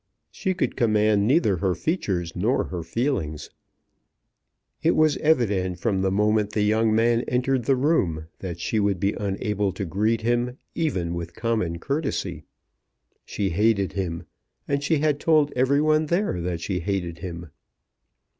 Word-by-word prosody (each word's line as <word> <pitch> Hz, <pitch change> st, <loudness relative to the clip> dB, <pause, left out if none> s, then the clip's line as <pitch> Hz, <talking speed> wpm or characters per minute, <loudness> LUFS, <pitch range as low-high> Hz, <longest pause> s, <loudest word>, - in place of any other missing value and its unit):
She 190 Hz, -2 st, -2 dB
could 185 Hz, -, -1 dB
command 105 Hz, -2 st, +2 dB
neither 115 Hz, -, +3 dB
her 90 Hz, +2 st, 0 dB
features 90 Hz, -, -2 dB
nor 110 Hz, +9 st, +1 dB
her 90 Hz, -2 st, -4 dB
feelings. 85 Hz, -, -2 dB, 1.3 s
It -, -, +3 dB
was 155 Hz, -2 st, +3 dB
evident 100 Hz, -, +1 dB
from 95 Hz, +1 st, 0 dB
the 95 Hz, -, +2 dB
moment 105 Hz, +1 st, +1 dB
the 105 Hz, -, +1 dB
young 110 Hz, +1 st, +2 dB
man 115 Hz, +1 st, +3 dB
entered 125 Hz, 0 st, 0 dB
the 135 Hz, -, +3 dB
room, 110 Hz, -, +1 dB
that 85 Hz, -3 st, -6 dB
she 110 Hz, +5 st, -1 dB
would 100 Hz, -3 st, +1 dB
be 100 Hz, +3 st, +1 dB
unable 100 Hz, 0 st, -1 dB
to 95 Hz, +1 st, -4 dB
greet 110 Hz, +6 st, 0 dB
him 120 Hz, +2 st, 0 dB, 0.2 s
even 95 Hz, -, -1 dB
with 85 Hz, 0 st, -6 dB
common 110 Hz, -8 st, -1 dB
courtesy. 100 Hz, -, -3 dB, 0.8 s
She 100 Hz, -2 st, -2 dB
hated 100 Hz, +1 st, +2 dB
him, 85 Hz, -4 st, -3 dB, 0.4 s
and 140 Hz, 0 st, 0 dB
she 160 Hz, +2 st, +2 dB
had 150 Hz, -1 st, +1 dB
told 155 Hz, -3 st, +3 dB
every 130 Hz, +3 st, +3 dB
one 155 Hz, 0 st, +2 dB
there 170 Hz, -, 0 dB
that 85 Hz, -1 st, -3 dB
she 90 Hz, +1 st, -2 dB
hated 85 Hz, -2 st, -3 dB
him. 85 Hz, -3 st, -7 dB
105 Hz, 155 wpm, -24 LUFS, 90-130 Hz, 1.3 s, neither